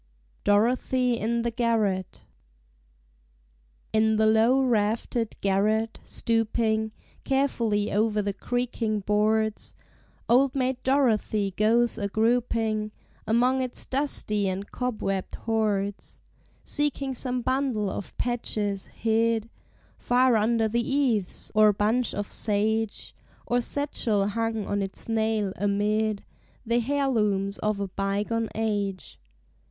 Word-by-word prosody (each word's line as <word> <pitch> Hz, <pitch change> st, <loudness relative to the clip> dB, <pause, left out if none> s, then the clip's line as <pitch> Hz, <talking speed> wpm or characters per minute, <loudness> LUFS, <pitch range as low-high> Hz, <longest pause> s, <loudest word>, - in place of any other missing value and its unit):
DOROTHY 245 Hz, +3 st, +2 dB
IN 235 Hz, +1 st, 0 dB
THE 235 Hz, -, -1 dB
GARRET. 220 Hz, -6 st, -1 dB, 1.7 s
In 220 Hz, 0 st, +3 dB
the 220 Hz, 0 st, +3 dB
low 220 Hz, +4 st, +4 dB
raftered 225 Hz, -1 st, 0 dB
garret, 215 Hz, +3 st, +1 dB
stooping 220 Hz, -1 st, 0 dB, 0.3 s
Carefully 230 Hz, -6 st, 0 dB
over 215 Hz, +1 st, +1 dB
the 200 Hz, -1 st, -1 dB
creaking 230 Hz, -2 st, -2 dB
boards, 215 Hz, +2 st, 0 dB, 0.5 s
Old 260 Hz, +3 st, +3 dB
Maid 255 Hz, -1 st, -1 dB
Dorothy 220 Hz, -7 st, +1 dB
goes 230 Hz, +2 st, +2 dB
a 200 Hz, -, -1 dB
groping 220 Hz, -1 st, 0 dB, 0.4 s
Among 250 Hz, +4 st, +2 dB
its 255 Hz, -1 st, -3 dB
dusty 235 Hz, -7 st, 0 dB
and 190 Hz, +2 st, -5 dB
cobwebbed 215 Hz, -6 st, -3 dB
hoards; 210 Hz, -3 st, -1 dB, 0.4 s
Seeking 285 Hz, -2 st, 0 dB
some 250 Hz, -1 st, -3 dB
bundle 255 Hz, -7 st, 0 dB
of 205 Hz, -, -7 dB
patches, 210 Hz, -5 st, -2 dB
hid 225 Hz, 0 st, 0 dB, 0.5 s
Far 250 Hz, 0 st, +3 dB
under 225 Hz, +1 st, +2 dB
the 235 Hz, +2 st, 0 dB
eaves, 245 Hz, -7 st, 0 dB
or 215 Hz, 0 st, +6 dB
bunch 220 Hz, +4 st, 0 dB
of 205 Hz, -, -2 dB
sage, 215 Hz, +1 st, -1 dB, 0.3 s
Or 245 Hz, +1 st, +1 dB
satchel 225 Hz, -7 st, -1 dB
hung 225 Hz, -1 st, -2 dB
on 205 Hz, 0 st, -1 dB
its 195 Hz, -1 st, -5 dB
nail, 220 Hz, -3 st, 0 dB
amid 210 Hz, +1 st, 0 dB, 0.4 s
The 235 Hz, +1 st, +1 dB
heirlooms 210 Hz, -8 st, 0 dB
of 210 Hz, -1 st, -1 dB
a 200 Hz, -, -2 dB
bygone 205 Hz, +4 st, -1 dB
age. 205 Hz, -3 st, -2 dB
220 Hz, 110 wpm, -26 LUFS, 210-240 Hz, 1.7 s, or